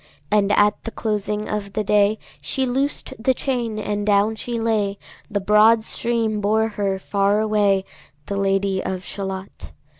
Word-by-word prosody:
And 205 -1 +3
at 205 0 +3
the - - -4
closing 210 -1 -2
of 200 -2 -4
the 215 - -1
day 210 +1 +3 0.2
She 265 -1 -1
loosed 270 +3 -2
the 260 +1 +3
chain, 240 -5 -2
and 210 -1 -2
down 205 +1 +3
she 235 +1 -4
lay; 215 -3 0 0.3
The 205 - -1
broad 215 +3 +5
stream 225 -2 -1
bore 220 +2 +2
her 200 -2 -1
far 200 +2 +1
away, 205 -3 +2 0.4
The 200 - -4
Lady 195 -1 +1
of 185 -1 -4
Shalott. 190 -1 -6
210 Hz, 155 wpm, -22 LUFS, 200-220 Hz, 0.4 s, broad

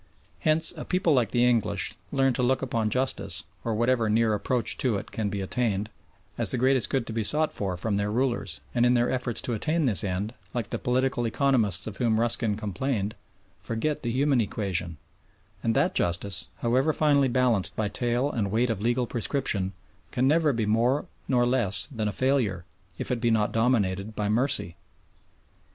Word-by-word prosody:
Hence 155 +1 +2
a - - -6
people 180 -3 +1
like 120 -6 +2
the 120 +1 +2
English 110 -4 +1 0.2
learn 135 -2 +2
to 125 - -2
look 130 +2 +1
upon 115 -4 -1
justice, 130 +3 0 0.2
or 115 -2 -2
whatever 120 0 +1
near 110 0 +2
approach 115 +4 0
to 125 -7 +1
it - - -8
can 105 -2 -2
be 100 0 -4
attained, 105 0 -2 0.5
as - - +3
the - - +5
greatest 130 -3 +2
good 135 -3 -1
to 115 - -6
be 115 0 -1
sought 155 +8 +4
for 95 -3 -2
from 100 +2 -1
their 100 0 -1
rulers 120 +2 -1
and 120 - +2
in 125 0 +4
their 120 0 +2
efforts 125 -2 -2
to 120 - -3
attain 155 +8 0
this 105 -10 +4
end, 100 +3 -3 0.2
like 120 -3 -3
the - - -2
political 125 -1 0
economists 110 - +2
of 105 -2 -6
whom 115 -3 +1
Ruskin 115 -2 +2
complained, 105 0 -2 0.5
forget 145 +7 -3
the 120 - -3
human 135 +1 +2
equation, 95 -6 -3 0.6
and 115 -1 0
that - - +2
justice, 90 +3 0
however 130 +6 +2
finely 145 -3 +3
balanced 120 -6 +1
by 110 - -1
tale 120 +6 -1
and 105 -4 -2
weight 115 +4 +1
of 105 -3 -4
legal 120 +2 +1
prescription, 115 -5 -1 0.4
can 125 +1 0
never 155 +1 +3
be 115 -4 -1
more 120 +7 +1 0.2
nor 125 -2 +2
less 120 -6 +1
than 110 -5 -2
a - - -1
failure, 110 -6 0 0.3
if - - -3
it 120 -2 -1
be 120 - +2
not 110 -2 +1
dominated 110 -3 0
by 105 - -1
mercy. 110 -6 +1
120 Hz, 185 wpm, -26 LUFS, 105-130 Hz, 0.6 s, the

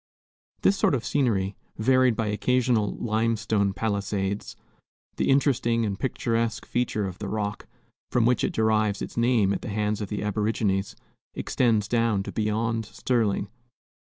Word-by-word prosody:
This 195 - +5
sort 195 -6 +2
of 125 - -3
scenery, 105 -9 +1 0.2
varied 130 +1 +3
by 115 - -1
occasional 115 0 +1
limestone 110 -2 0
palisades, 100 -1 -2 0.6
the - - +1
interesting 120 -4 +2
and 100 -1 -3
picturesque 115 -3 -1
feature 115 -4 -1
of 95 -2 -6
the 105 - -4
Rock, 105 0 -3 0.4
from 120 -2 +3
which 125 0 +2
it - - +1
derived 110 -2 +1
its - - -7
name 115 -4 +3
at - - -3
the - - -6
hands 105 0 -1
of 100 - -4
the 105 -1 -3
aborigines, 105 -1 0 0.4
extends 110 -5 +1
down 115 -3 +1
to - - -6
beyond 110 +1 -1
Sterling. 110 -6 0
110 Hz, 145 wpm, -26 LUFS, 105-115 Hz, 0.6 s, This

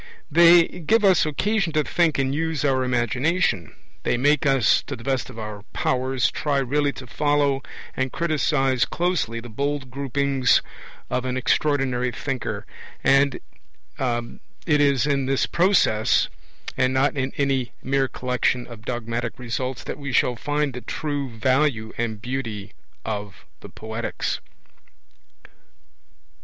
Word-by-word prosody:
They 170 +2 +8
give 210 +6 +1
us 185 -5 +5
occasion 190 +3 0
to 155 -1 +2
think 170 0 +1
and 135 0 0
use 160 -1 -1
our 130 -2 +2
imagination. 125 - 0 0.3
They - - 0
make 145 +3 +3
us, 135 -6 +4
to - - -4
the 115 - -12
best 130 -1 -1
of 125 - -11
our 105 -2 -6
powers, 130 -1 0
try 145 -2 -1
really 140 +2 +1
to 130 - -9
follow 145 +1 +1 0.3
and 130 -1 -1
criticize 145 -6 +1
closely 170 -10 -1
the 120 - -9
bold 140 +2 -3
gropings 140 -1 +2 0.5
of 125 - 0
an 130 0 -2
extraordinary 130 -2 +1
thinker; 130 +2 -4 0.4
and 135 0 +4 0.6
it 125 +5 -2
is 140 -2 +3
in 140 -2 0
this 135 0 +2
process, 170 - +3 0.5
and 130 0 +1
not 135 +3 +2
in 135 -1 -1
any 135 -3 0
mere 135 0 +1
collection 125 -1 -1
of 115 -2 -12
dogmatic 120 -1 -3
results, 125 +1 -4
that - - -6
we 140 -2 -4
shall 125 0 +2
find 145 +2 -1
the 125 - -6
true 145 -2 -3
value 120 -1 +1
and 110 -2 -3
beauty 115 -6 -4 0.3
of 105 -2 -5
the - - -11
Poetics. 110 +1 -4
135 Hz, 135 wpm, -23 LUFS, 120-145 Hz, 0.6 s, They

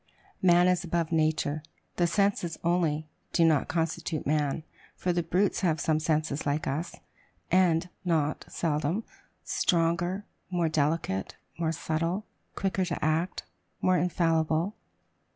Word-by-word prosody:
Man 175 -1 +6
is 180 0 +2
above 170 -1 -1
nature. 155 -2 +1 0.4
The 175 - +3
senses 195 -4 +1
only, 165 -3 +1 0.3
do 170 - +4
not 155 -4 +3
constitute 165 -1 -2
man; 150 +1 0 0.3
for 180 - 0
the 175 - +1
brutes 180 +5 +1
have 165 -4 +2
some 155 +1 +1
senses 155 -1 0
like 145 +2 0
us, 155 +6 -2 0.6
and, 175 -2 +4 0.2
not 155 -4 0
seldom, 160 +5 -1 0.4
stronger, 175 +3 +1 0.2
more 175 -3 +1
delicate, 150 -10 0 0.2
more 160 -1 +1
subtile, 165 +6 -1 0.3
quicker 190 -1 0
to 170 - -2
act, 160 +4 0 0.4
more 185 -1 +3
infallible. 165 +1 +1
165 Hz, 125 wpm, -28 LUFS, 155-175 Hz, 0.6 s, Man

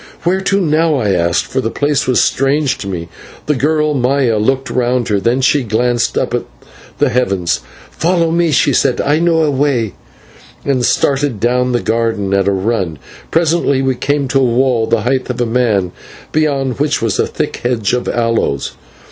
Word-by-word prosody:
"Where 185 +3 +1
to 195 +1 +1
now?" 160 -2 +2
I 110 -7 0
asked, 85 -2 +1
for - - -2
the 115 - -2
place 145 +2 0
was 125 - +3
strange 135 +1 +1
to 100 - -6
me. 85 -3 -4 0.4
The 150 - +1
girl, 150 +2 +1
Maya, 125 -3 +1
looked 130 +3 0
round 125 0 0
her, 100 -2 +1
then 120 +6 +1
she 135 +2 +3
glanced 120 +1 0
up - - -1
at - - +1 0.6
the - - +2
heavens. 95 -9 0 0.3
"Follow 170 -1 +1
me," 170 0 +2
she 145 - +2
said, 130 -3 +1
"I 145 +2 +1
know 165 -1 +2
a 150 - +1
way," 130 -7 0 0.7
and 135 -3 0
started 135 -2 +1
down 125 +3 +1
the 120 -1 0
garden 110 -3 -1
at 100 0 +2
a - - +3
run. 95 -4 -1 0.3
Presently 160 -5 +1
we 130 0 +1
came 140 +2 -1
to 135 +1 +2
a - - +3
wall 120 -2 +1
the 115 - +1
height 130 +3 -1
of 125 - -3
a 120 - +1
man, 110 -6 +1 0.4
beyond 140 -4 0
which 145 0 +1
was 110 -3 0
a - - +2
thick - - -3
hedge 120 -4 -1
of 125 - -1
aloes. 115 - 0
125 Hz, 190 wpm, -15 LUFS, 115-145 Hz, 0.7 s, was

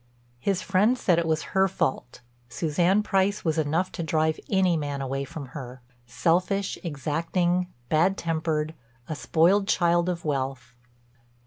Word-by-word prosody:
His 190 +8 -1
friends 210 +6 +2
said 175 -3 +3
it 170 - -1
was 160 +2 -2
her 190 0 +4
fault; 130 -9 -2 0.3
Suzanne 175 - +1
Price 195 0 +1
was 160 -1 +1
enough 160 +5 0
to - - -5
drive 160 0 0
any 190 -3 +3
man 145 -3 -3
away 135 +1 -3
from 140 -1 -8
her—selfish, 130 - -2
exacting, 170 +4 0 0.2
bad 170 +7 +2
tempered, 160 -1 -1 0.3
a 155 - -3
spoiled 180 +7 +3
child 175 -3 +2
of 170 -2 -4
wealth. 135 -3 -3
165 Hz, 135 wpm, -26 LUFS, 145-185 Hz, 0.3 s, her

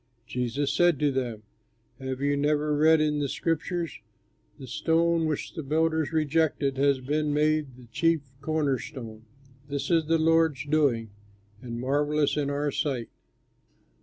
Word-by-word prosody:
Jesus 125 +4 -2
said 175 -3 +4
to 145 +1 +1
them, 120 -5 -3 0.6
"Have 130 0 -4
you 145 0 +2
never 150 +1 +1
read 160 +2 +5
in 150 -1 +1
the 140 -1 -1
scriptures: 165 +2 -2 0.6
"'The 135 - -9
stone 165 +5 +1
which 155 -2 -3
the - - -5
builders 160 +1 0
rejected 155 -3 +1
Has 140 -1 +3
been 150 +3 -1
made 150 -3 +1
the 125 - -14
chief 165 +7 +1 0.2
corner 145 -3 0
stone; 115 -6 -9 0.4
This 140 +3 -3
is 165 -2 +3
the 165 0 +3
Lord's 160 -4 +2
doing, 140 -8 +1 0.5
And 120 -1 -6
marvellous 145 +3 +1
in 145 -2 0
our 145 +1 -1
sight.'" 135 -5 -2
145 Hz, 145 wpm, -27 LUFS, 135-160 Hz, 0.6 s, read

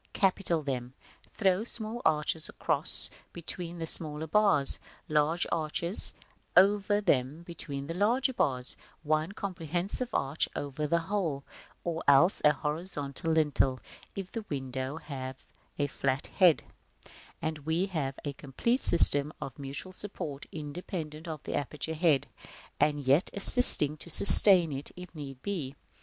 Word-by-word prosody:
Capital 185 -4 -1
them; 125 -2 -6 0.4
throw 190 -1 0
small 230 0 -7
arches 155 0 -2
across - - -2 0.2
between 170 0 -8
the 165 - -6
smaller 155 -1 -3
bars, 160 -5 0 0.3
large 155 +3 -1
arches 170 +4 -1 0.4
over 205 +2 +2
them 150 -3 -2
between 145 -5 -9
the 165 - -7
larger 240 +8 -1
bars, 130 - -1 0.3
one 155 +3 -2
comprehensive 185 - -6
arch 140 +3 -3
over 145 +1 -5
the 170 - 0
whole, 165 -7 -4 0.4
or 165 -1 -5
else 145 +7 +3
a 150 - +4
horizontal 150 0 -6
lintel, 145 -4 0 0.4
if 195 -2 -8
the 225 - -7
window 130 0 -6
have 135 -4 -9 0.3
a 145 - -1
flat 135 -1 -4
head; 180 -5 +1 0.8
and 155 -1 -5
we 160 +5 -3
have 150 -8 -5
a 145 - -5
complete 150 - -4
system 145 -3 +6
of 135 - -10
mutual 140 +7 -8
support, 155 -8 -9
independent 155 +1 -8
of 155 -3 -8
the - - -7
aperture 145 +2 -5
head, 155 -4 0 0.5
and 150 -1 0
yet 140 +8 +1
assisting 195 - +10
to 170 - -12
sustain 180 -1 +8
it, 135 +1 -8
if 180 -1 -13
need 140 -5 -10
be. 160 -10 -6
155 Hz, 135 wpm, -27 LUFS, 140-180 Hz, 0.8 s, assisting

